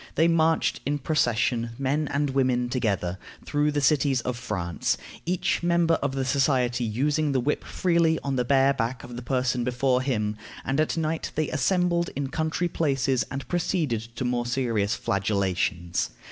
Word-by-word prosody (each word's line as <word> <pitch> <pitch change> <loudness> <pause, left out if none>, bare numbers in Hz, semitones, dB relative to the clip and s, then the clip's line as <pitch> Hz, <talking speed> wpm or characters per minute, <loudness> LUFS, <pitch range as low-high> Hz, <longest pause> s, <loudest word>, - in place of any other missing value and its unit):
They 165 - +4
marched 165 -1 +2
in 145 +1 0
procession, 120 -5 0
men 140 +3 0
and 145 0 0
women 130 -2 +1
together, 100 -7 -1 0.3
through 150 0 +1
the 145 0 0
cities 135 -1 +3
of 125 +1 -3
France, 85 -9 -2 0.3
each 180 0 0
member 170 -1 +3
of 140 -1 -1
the 135 -1 -1
society 130 -3 +1
using 145 +6 0
the 130 - +2
whip 145 +4 -1
freely 170 -3 +2
on 140 -1 -1
the 125 - +1
bare 135 +2 +4
back 125 0 -2
of 120 0 -9
the 120 - -5
person 125 -1 0
before 125 +1 +1
him; 105 -5 -1 0.3
and 135 +2 0
at 155 +2 +1
night 160 0 -1
they 155 -1 0
assembled 170 +4 +1
in 140 0 -2
country 160 +4 -1
places, 135 -6 0
and 135 -2 -5
proceeded 155 - -1
to 125 - -3
more 120 -1 0
serious 115 -5 0
flagellations. 95 -3 -1
135 Hz, 165 wpm, -26 LUFS, 120-150 Hz, 0.3 s, They